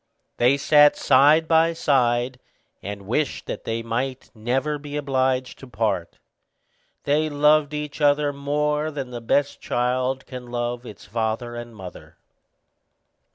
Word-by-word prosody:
They 125 Hz, +3 st, +4 dB
sat 145 Hz, +1 st, +5 dB
side 145 Hz, +4 st, +4 dB
by 165 Hz, +1 st, +4 dB
side, 125 Hz, -5 st, +1 dB, 0.4 s
and 100 Hz, 0 st, -7 dB
wished 125 Hz, +8 st, -2 dB
that -, -, -6 dB
they 115 Hz, 0 st, -2 dB
might 125 Hz, +3 st, -3 dB
never 130 Hz, +7 st, -1 dB
be 145 Hz, 0 st, -6 dB
obliged 130 Hz, -3 st, -1 dB
to 135 Hz, -, -11 dB
part. 105 Hz, -6 st, -2 dB, 0.9 s
They 150 Hz, +2 st, +1 dB
loved 150 Hz, 0 st, +3 dB
each 150 Hz, 0 st, -5 dB
other 145 Hz, 0 st, +3 dB
much 140 Hz, 0 st, -13 dB
more 150 Hz, +1 st, 0 dB
than 135 Hz, -4 st, -6 dB
the 120 Hz, -1 st, -6 dB
best 140 Hz, +5 st, 0 dB
child 125 Hz, +2 st, -1 dB
can 125 Hz, -1 st, -9 dB
love 120 Hz, 0 st, -3 dB
its 105 Hz, -, -11 dB
father 115 Hz, +3 st, -2 dB
and 120 Hz, -1 st, -8 dB
mother. 95 Hz, -3 st, -11 dB
130 Hz, 140 wpm, -23 LUFS, 120-145 Hz, 0.9 s, sat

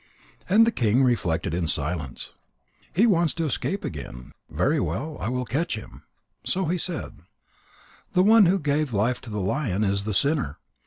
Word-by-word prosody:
And 215 Hz, +4 st, +6 dB
the 230 Hz, -, +2 dB
king 120 Hz, -, +2 dB
reflected 90 Hz, -10 st, 0 dB
in 85 Hz, -1 st, -1 dB
silence: 75 Hz, -4 st, -3 dB, 0.6 s
"He 200 Hz, +8 st, +3 dB
wants 170 Hz, -8 st, +2 dB
to 165 Hz, -1 st, -1 dB
escape 185 Hz, +7 st, -2 dB
again. 65 Hz, -4 st, -7 dB, 0.2 s
Very 150 Hz, +3 st, +1 dB
well. 150 Hz, +3 st, -3 dB
I 110 Hz, -, -2 dB
will 125 Hz, 0 st, -2 dB
catch 155 Hz, +5 st, -1 dB
him 110 Hz, -, -9 dB
again." -, -, -15 dB, 0.4 s
So 190 Hz, 0 st, -1 dB
he 175 Hz, +3 st, -1 dB
said: 170 Hz, -3 st, -4 dB, 0.9 s
"The 180 Hz, -, +4 dB
one 215 Hz, -1 st, +7 dB
who 190 Hz, +3 st, +3 dB
gave 145 Hz, -4 st, -1 dB
life 120 Hz, +5 st, +1 dB
to 125 Hz, -, -10 dB
the 105 Hz, -1 st, -3 dB
lion, 105 Hz, 0 st, -1 dB
is 100 Hz, 0 st, 0 dB
the 105 Hz, -2 st, -1 dB
sinner. 140 Hz, -, +1 dB
130 Hz, 175 wpm, -25 LUFS, 100-170 Hz, 0.9 s, one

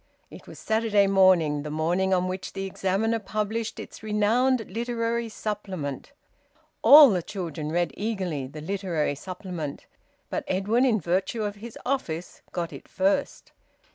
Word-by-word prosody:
It -, -, -12 dB
was -, -, -11 dB
Saturday 220 Hz, -2 st, +2 dB
morning, 185 Hz, -7 st, +4 dB
the 150 Hz, -, -6 dB
morning 170 Hz, +5 st, 0 dB
on 185 Hz, -1 st, +2 dB
which 185 Hz, +1 st, -5 dB
the 195 Hz, 0 st, -4 dB
"Examiner" 195 Hz, +4 st, 0 dB
published 215 Hz, +2 st, -3 dB
its -, -, -9 dB
renowned 225 Hz, +3 st, +2 dB
Literary 230 Hz, +1 st, -2 dB
Supplement. 195 Hz, -, -5 dB, 0.7 s
All 290 Hz, -3 st, +10 dB
the 180 Hz, -3 st, 0 dB
children 165 Hz, -5 st, -5 dB
read 175 Hz, +1 st, 0 dB
eagerly 185 Hz, -10 st, -3 dB
the 150 Hz, +3 st, -9 dB
Literary 175 Hz, -4 st, -1 dB
Supplement; 175 Hz, -1 st, -6 dB, 0.5 s
but -, -, -2 dB
Edwin, 210 Hz, +7 st, +2 dB
in 225 Hz, -4 st, +3 dB
virtue 190 Hz, +5 st, -1 dB
of 205 Hz, 0 st, -3 dB
his 225 Hz, +2 st, -9 dB
office, 180 Hz, -11 st, -3 dB
got 170 Hz, -1 st, -3 dB
it -, -, -11 dB
first. 195 Hz, +9 st, -1 dB
195 Hz, 140 wpm, -26 LUFS, 175-220 Hz, 0.7 s, All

